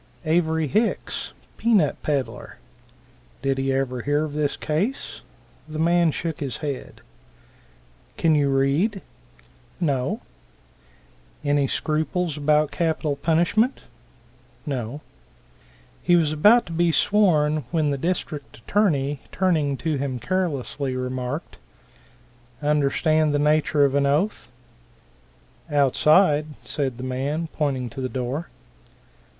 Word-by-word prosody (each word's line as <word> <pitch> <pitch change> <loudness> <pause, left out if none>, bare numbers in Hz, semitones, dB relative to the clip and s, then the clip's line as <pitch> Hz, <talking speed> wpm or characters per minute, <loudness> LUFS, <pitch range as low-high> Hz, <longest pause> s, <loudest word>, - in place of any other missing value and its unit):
Avery 160 0 +2
Hicks, 215 - -1 0.3
pea 235 0 +2
nut 155 -8 +3
peddler. 140 -4 -3 0.9
Did 135 -1 0
he 135 0 0
ever 130 -2 -1
hear 145 +4 +1
of 150 - -7
this 150 -1 -1
case? 190 - -2 0.5
The 155 - -6
man 170 +1 +3
shook 160 +1 -3
his 140 -4 -3
head. 145 -4 -6 1.2
"Can 165 -1 +3
you 145 -2 +3
read?" 140 +10 +1 0.8
"No." 140 -7 0 1.2
"Any 145 -1 +2
scruples 155 +3 -1
about 150 0 +2
capital 160 -3 0
punishment?" 170 - +1 0.8
"No." 135 -1 -4 1.0
He 175 - +4
was 160 -3 +3
about 210 +11 +5
to - - -9
be 170 +1 +2
sworn, 155 - +2
when 155 -1 +1
the - - 0
district 160 -3 -3
attorney 145 - +1
turning 155 -7 +1
to 155 0 -1
him 135 -2 -2
carelessly, 140 -4 -2
remarked, 130 +3 -4 1.0
"Understand 150 +1 +2
the - - +4
nature 150 0 +3
of 135 - 0
an 140 0 +2
oath?" 150 - 0 1.2
"Outside," 150 +3 +4 0.2
said 135 -5 -2
the 125 - -7
man, 140 +6 -2
pointing 135 -5 -1
to 135 - -6
the 130 - -2
door. 130 +6 -3
150 Hz, 115 wpm, -24 LUFS, 140-165 Hz, 1.2 s, about